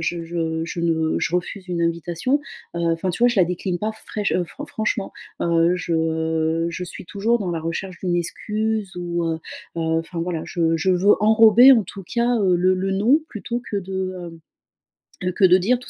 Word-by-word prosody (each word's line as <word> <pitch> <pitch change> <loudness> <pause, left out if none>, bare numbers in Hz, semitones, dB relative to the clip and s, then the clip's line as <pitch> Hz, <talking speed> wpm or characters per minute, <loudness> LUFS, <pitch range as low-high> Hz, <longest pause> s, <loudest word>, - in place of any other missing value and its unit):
je 165 -1 -2
je 165 -1 0
je 175 - -1
refuse 180 +1 -5
une 175 -1 -2
invitation, 170 - 0 0.4
heu, - - -2
enfin, 175 +3 -2
tu 175 - -5
vois, 245 - +7
je 235 - 0
la - - +6
décline 180 0 -2
pas 215 +1 -2
fraich 210 -2 -2
heu, 180 - +1
fran - - -9
franchement. 215 -2 -2 0.3
Heu, 170 +1 +3
je 160 -1 0
je 175 +2 -5
suis 175 - -9
toujours 220 +5 0
dans 190 -5 -3
la 165 - -2
recherche 175 +3 -4
d'une 175 -2 0
excuse 210 +3 -2
ou, 175 -1 -2
heu, 165 -1 0 0.4
heu, - - -1
enfin, 165 +1 -1
voilà, 165 -2 -2
je 165 -2 +1
je 190 +3 +1
veux 185 +3 +5
enrober, 220 +3 +7
en 225 -6 +4
tout 195 +2 -9
cas, 240 +5 +1
heu, 185 -3 +3
le 185 +2 +3
le 190 +1 -2
non, 225 +11 +3
plutôt 240 +3 -5
que 205 - -1
de, 190 -1 -4
hem, 165 -1 -11 0.9
heu 185 - +1
que 195 - -1
de 185 0 +7
dire, 230 +7 +1
tout 250 - -12
180 Hz, 200 wpm, -22 LUFS, 165-205 Hz, 0.9 s, vois